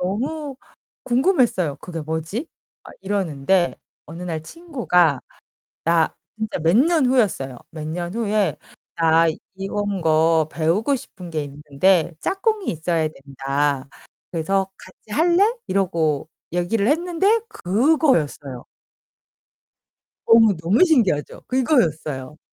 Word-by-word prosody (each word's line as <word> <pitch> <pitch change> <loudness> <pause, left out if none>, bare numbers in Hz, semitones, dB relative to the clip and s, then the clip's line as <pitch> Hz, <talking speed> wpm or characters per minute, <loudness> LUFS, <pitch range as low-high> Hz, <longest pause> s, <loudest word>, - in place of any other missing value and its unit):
너무 270 - -3 0.5
궁금했어요. 245 - +2
'그게 170 -2 -6
뭐지?' 160 - -4 0.4
막 - - -12
이러는데 185 -3 0 0.3
어느 165 +3 -9
날 165 -3 -4
친구가 180 - +1 0.6
나 165 -1 +2 0.2
진짜 220 0 -3
몇 165 +5 +3
년 310 +2 +4
후였어요. 195 - +1
몇 155 -2 -7
년 175 +3 -4
후에 210 -7 0 0.4
"나 165 0 +4 0.3
이런 195 0 -3
거 160 -1 +3
배우고 170 - +1
싶은 180 -7 -11
게 155 -2 -2
있는데 150 +5 +1
짝꿍이 410 +1 -1
있어야 160 -1 -1
된다. 140 -1 -2 0.4
그래서 190 +3 0
같이 185 +3 -15
할래?" 345 - +4 0.2
이러고 165 -6 0 0.2
얘기를 195 +5 0
했는데 355 - +2
그거였어요. 195 - +1 1.6
너무, 225 -2 +6
너무 175 - +3
신기하죠? 230 - +1
그거였어요. 160 - 0
180 Hz, 240 characters per minute, -22 LUFS, 155-240 Hz, 1.6 s, 너무